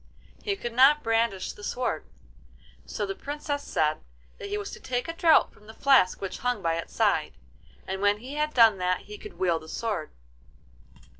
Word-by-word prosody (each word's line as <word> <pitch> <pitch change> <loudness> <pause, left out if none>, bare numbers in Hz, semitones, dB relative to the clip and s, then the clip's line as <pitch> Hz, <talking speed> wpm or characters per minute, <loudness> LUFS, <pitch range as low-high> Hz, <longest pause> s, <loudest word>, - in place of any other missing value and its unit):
He 400 -2 -1
could 240 -11 -5
not 275 +5 +6
brandish 225 -4 0
the 205 - -14
sword; 225 -8 -2 0.8
so 205 - -3
the 195 - -3
Princess 285 +4 -4
said 155 - 0 0.4
that 200 - -6
he 205 - -1
was 205 - -5
to - - -9
take 245 +2 -3
a 330 - -3
draught 335 -1 +4
from 210 - -20
the 220 - -12
flask 265 -10 +4
which 195 - -5
hung 245 -5 -1
by 165 -1 +1
its 165 - -7
side, - - +1 0.5
and 190 +1 -4
when 205 0 +3
he 250 +6 -9
had 300 +1 0
done 225 -5 +6
that 180 0 0
he 420 0 -11
could 420 - -11
wield 170 -3 +1
the 160 - -12
sword. 205 -8 -3
225 Hz, 195 wpm, -27 LUFS, 190-280 Hz, 0.8 s, not